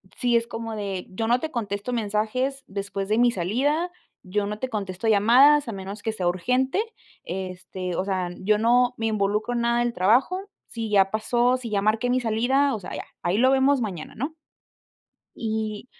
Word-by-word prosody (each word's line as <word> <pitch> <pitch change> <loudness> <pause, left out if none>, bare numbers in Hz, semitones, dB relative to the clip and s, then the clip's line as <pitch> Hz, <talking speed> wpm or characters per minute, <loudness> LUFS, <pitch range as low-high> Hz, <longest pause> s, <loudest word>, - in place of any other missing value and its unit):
sí 240 -1 +2
es 230 - -1
como 225 -1 -5
de: 195 -3 -4
"Yo 225 +4 -3
no 245 +2 +3
te 315 - -3
contesto 210 -1 -3
mensajes 235 +5 -1
después 195 0 -4
de 215 - +2
mi 240 0 +5
salida, 275 - 0 0.3
yo 200 +2 -1
no 210 +1 -4
te 260 - -3
contesto 195 -2 -3
llamadas 255 +7 +6
a 230 - -4
menos 195 +2 -7
que 220 +1 -2
sea 185 -4 -2
urgente", 250 - +1 0.4
este, 185 -1 -5
o 185 - -1
sea, 185 -2 -1
yo 210 +2 +2
no 245 +3 +3
me 225 - -1
involucro 215 +2 0
en 235 - 0
nada 235 0 +2
del 240 0 0
trabajo, 235 - +3 0.3
sí 230 -2 -5
ya 195 -2 +4
pasó, 240 +3 +2
sí 250 -2 -7
ya 200 -2 0
marqué 220 +4 +1
mi 255 - +2
salida, 245 +5 +2
o - - -5
sea, 180 - -7
ya, - - -6 0.2
"Ahí 175 +4 +1
lo 260 +2 +5
vemos 270 0 +3
mañana", 185 -8 -5
¿no? 285 +7 -4 1.0
Y 220 -1 -3
220 Hz, 190 wpm, -25 LUFS, 200-245 Hz, 1.0 s, llamadas